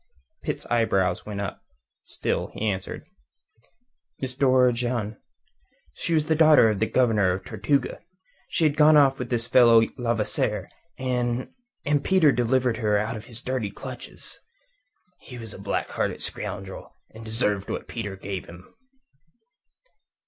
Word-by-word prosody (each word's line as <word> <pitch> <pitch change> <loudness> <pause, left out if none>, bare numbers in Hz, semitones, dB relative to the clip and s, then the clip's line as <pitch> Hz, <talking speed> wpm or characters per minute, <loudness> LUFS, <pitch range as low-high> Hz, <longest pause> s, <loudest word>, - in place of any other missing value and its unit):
Pitt's 150 - -4
eyebrows 95 -7 +1
went 100 -1 -4
up; 100 - -5 0.4
still - - -2
he 110 - -2
answered. 95 -2 -3 1.1
"Miss 130 -1 -3
d'Ogeron. 125 -4 +2 0.8
She 165 - -2
was 155 -1 +2
the 160 0 +2
daughter 155 -8 +6
of 105 - -3
the 110 - +1
Governor 105 -7 +3
of 95 +1 -6
Tortuga. 135 +6 -1 0.5
She - - 0
had 150 -2 +3
gone 155 0 +6
off 135 -2 +4
with 125 -1 -4
this 115 -2 -1
fellow 120 -2 +6 0.2
Levasseur, 115 -3 -1 0.3
and... 125 -1 -2 0.3
and 145 -1 +1
Peter 185 -6 +4
delivered 125 0 +1
her 105 -3 +2
out 110 +3 -1
of 110 - -8
his 120 +1 -10
dirty 125 -5 -2
clutches. 130 +5 -10 0.8
He 125 - -11
was 115 -3 -8
a - - -10
black 100 0 -2
hearted - - -2
scoundrel, 95 -1 -6 0.2
and 110 +1 -10
deserved 105 -3 -1
what - - -4
Peter 105 -5 -5
gave 95 -1 -5
him." 90 +2 -14
120 Hz, 140 wpm, -25 LUFS, 105-130 Hz, 1.1 s, daughter